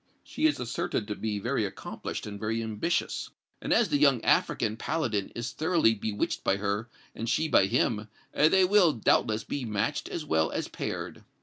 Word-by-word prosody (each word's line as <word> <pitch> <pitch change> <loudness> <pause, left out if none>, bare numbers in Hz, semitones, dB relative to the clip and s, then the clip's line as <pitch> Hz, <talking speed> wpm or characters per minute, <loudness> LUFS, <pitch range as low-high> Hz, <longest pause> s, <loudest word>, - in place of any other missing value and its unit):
She 315 - +1
is 300 - 0
asserted 115 -2 -2
to 105 - -3
be 110 -1 -3
very 120 +4 -1
accomplished 95 -1 -5
and 100 -1 -7
very 115 +2 -1
ambitious, 110 +11 -2 0.3
and, - - -4
as 235 - +4
the 145 - +2
young 140 -4 +5
African 110 0 +2
paladin 115 -7 -1
is 115 0 -4
thoroughly 160 -7 +2
bewitched 105 -1 -2
by 95 - +2
her, 100 +3 -2 0.2
and 115 +1 -4
she 155 +7 +1
by 110 -9 +4
him, 105 +1 0 0.3
they 185 +5 +5
will, 185 -4 +5
doubtless, 110 0 +2
be 140 - -4
matched 110 +4 -2
as 160 - -4
well 80 - +2
as - - -3
paired." - - -5
115 Hz, 180 wpm, -28 LUFS, 105-150 Hz, 0.3 s, young